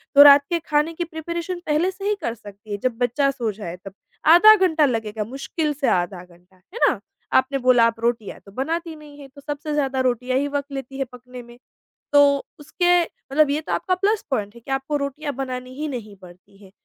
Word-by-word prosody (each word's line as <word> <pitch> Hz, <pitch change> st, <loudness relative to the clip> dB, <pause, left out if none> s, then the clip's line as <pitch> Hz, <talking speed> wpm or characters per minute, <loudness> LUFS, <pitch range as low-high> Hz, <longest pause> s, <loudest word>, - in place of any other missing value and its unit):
तो 285 Hz, -, +11 dB
रात 285 Hz, 0 st, +8 dB
के 340 Hz, -, 0 dB
खाने 300 Hz, +2 st, +1 dB
की 345 Hz, -, -3 dB
प्रिपरेशन 340 Hz, +2 st, -5 dB
पहले 310 Hz, +5 st, +1 dB
से 390 Hz, +1 st, -9 dB
ही 420 Hz, -, +1 dB
कर 235 Hz, -, -2 dB
सकती 205 Hz, -1 st, -13 dB
हैं 205 Hz, -, -3 dB
जब 250 Hz, -3 st, 0 dB
बच्चा 250 Hz, +3 st, +1 dB
सो 235 Hz, -5 st, -3 dB
जाए 190 Hz, -4 st, -7 dB
तब, 195 Hz, -, -8 dB, 0.3 s
आधा 355 Hz, +7 st, +8 dB
घंटा 350 Hz, -6 st, +3 dB
लगेगा 220 Hz, -4 st, -2 dB
मुश्किल 275 Hz, +6 st, -3 dB
से 280 Hz, -1 st, -2 dB
आधा 175 Hz, 0 st, 0 dB
घंटा, 180 Hz, +1 st, -23 dB
है 205 Hz, -, -12 dB
ना? -, -, 0 dB, 0.3 s
आपने 265 Hz, +1 st, +3 dB
बोला 250 Hz, -2 st, +5 dB
आप 230 Hz, 0 st, -4 dB
रोटियाँ 230 Hz, -3 st, -2 dB
तो 200 Hz, -, -14 dB
बनाती 325 Hz, -, -3 dB
नहीं 295 Hz, -1 st, -14 dB
हैं, 275 Hz, -1 st, -11 dB
तो 280 Hz, +1 st, -15 dB
सबसे 295 Hz, +1 st, -5 dB
ज़्यादा 270 Hz, -3 st, 0 dB
रोटियाँ 255 Hz, 0 st, 0 dB
ही 285 Hz, -, -1 dB
वक़्त 285 Hz, 0 st, -4 dB
लेती 270 Hz, -1 st, -6 dB
हैं 270 Hz, -, -1 dB
पकने 250 Hz, 0 st, -11 dB
में, 240 Hz, 0 st, -15 dB, 0.6 s
तो 285 Hz, -1 st, +5 dB, 0.2 s
उसके 350 Hz, +4 st, +2 dB
मतलब 305 Hz, -2 st, 0 dB
ये 295 Hz, +2 st, 0 dB
तो -, -, -7 dB
आपका 370 Hz, -, 0 dB
प्लस 405 Hz, +3 st, 0 dB
पॉइंट 210 Hz, -4 st, -2 dB
है 235 Hz, -, -14 dB
कि 270 Hz, -, -9 dB
आपको 270 Hz, +2 st, -2 dB
रोटियाँ 285 Hz, +1 st, -4 dB
बनानी 255 Hz, -1 st, -5 dB
ही 305 Hz, +2 st, -4 dB
नहीं 230 Hz, -7 st, -7 dB
पड़ती 180 Hz, +2 st, -17 dB
हैं, 190 Hz, -, -16 dB
275 Hz, 215 wpm, -22 LUFS, 235-305 Hz, 0.6 s, तो